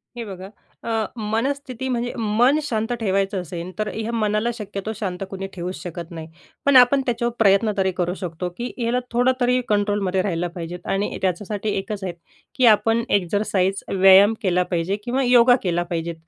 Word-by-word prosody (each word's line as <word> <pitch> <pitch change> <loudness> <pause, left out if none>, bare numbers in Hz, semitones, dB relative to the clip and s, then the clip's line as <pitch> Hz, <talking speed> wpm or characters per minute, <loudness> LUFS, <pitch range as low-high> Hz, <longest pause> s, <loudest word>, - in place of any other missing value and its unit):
हे 235 - -5
बघा, 190 -1 -8 0.4
अ, 225 -2 -1 0.2
मनस्थिती 260 +4 -2
म्हणजे 240 0 -2
मन 235 +7 +3
शांत 225 -3 -2
ठेवायचं 195 -2 0
असेल 175 +1 -7
तर 215 - 0
ह्या 225 +1 -3
मनाला 215 +1 0
शक्यतो 210 -1 -5
शांत 190 -2 -4
कुणी 195 0 -5
ठेवूच 180 0 -5
शकत 170 0 -7
नाही. 160 -1 -7 0.4
पण 280 -1 +4
आपण 255 +2 +7
त्याच्यावर 235 -1 -1
प्रयत्न 210 +1 +4
तरी 190 -1 +2
करू 175 0 0
शकतो 180 0 -4
की 240 +1 -4
याला 240 +2 +1
थोडं 245 +2 +3
तरी 250 +1 +3
कंट्रोलमध्ये 205 -2 +1
राहिला 175 -2 -1
पाहिजे. 175 +1 -5
आणि 195 +1 -1
त्याच्यासाठी 205 +3 -2
एकच 200 0 -4
आहे 180 -2 -3 0.4
की 255 -3 +3
आपण 225 +2 0
एक्झरसाइज, 195 0 0
व्यायाम 195 +2 +6
केला 180 -2 +2
पाहिजे 175 +3 0
किंवा 260 +2 0
योगा 245 0 +6
केला 175 -1 0
पाहिजे. 170 -1 -3
205 Hz, 170 wpm, -22 LUFS, 185-235 Hz, 0.4 s, आपण